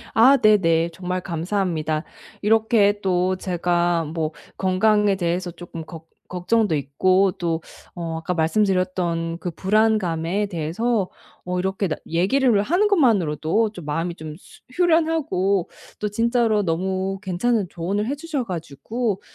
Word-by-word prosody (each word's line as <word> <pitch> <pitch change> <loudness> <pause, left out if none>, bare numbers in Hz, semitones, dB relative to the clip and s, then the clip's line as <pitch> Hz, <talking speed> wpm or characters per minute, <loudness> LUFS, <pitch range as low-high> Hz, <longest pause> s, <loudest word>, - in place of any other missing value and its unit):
아, 260 +5 +7
네네. 170 -7 +3
정말 180 +1 -3
감사합니다. 165 -3 -2 0.4
이렇게 215 -1 +3
또 185 -1 +1
제가 175 -2 0
뭐 160 0 -3 0.3
건강에 205 +2 +3
대해서 175 0 -1
쪼끔 170 -1 -9
걱 165 -1 -11 0.2
걱정도 185 +1 +1
있고 185 +7 +2
또 165 -2 -1 0.3
어 165 -2 -4
아까 165 +3 -3
말씀드렸던 175 -2 0
그 175 - -4
불안감에 195 -1 +1
대해서 190 +5 -1 0.4
어 180 0 -2
이렇게 190 +1 -1
나 155 - -2
얘기를 205 +7 +2
하는 360 - +2
것만으로도 215 - +2
좀 175 -7 -10
마음이 165 +3 -2
좀 155 -2 -8
수 - - -18
후련하고 315 - +1 0.3
또 210 - -1
진짜로 230 -1 +1
너무 190 +2 -1
괜찮은 205 +2 0
조언을 200 +6 -2
해주셔 290 -2 -3
가지고 190 - -3
185 Hz, 280 characters per minute, -22 LUFS, 170-215 Hz, 0.4 s, 아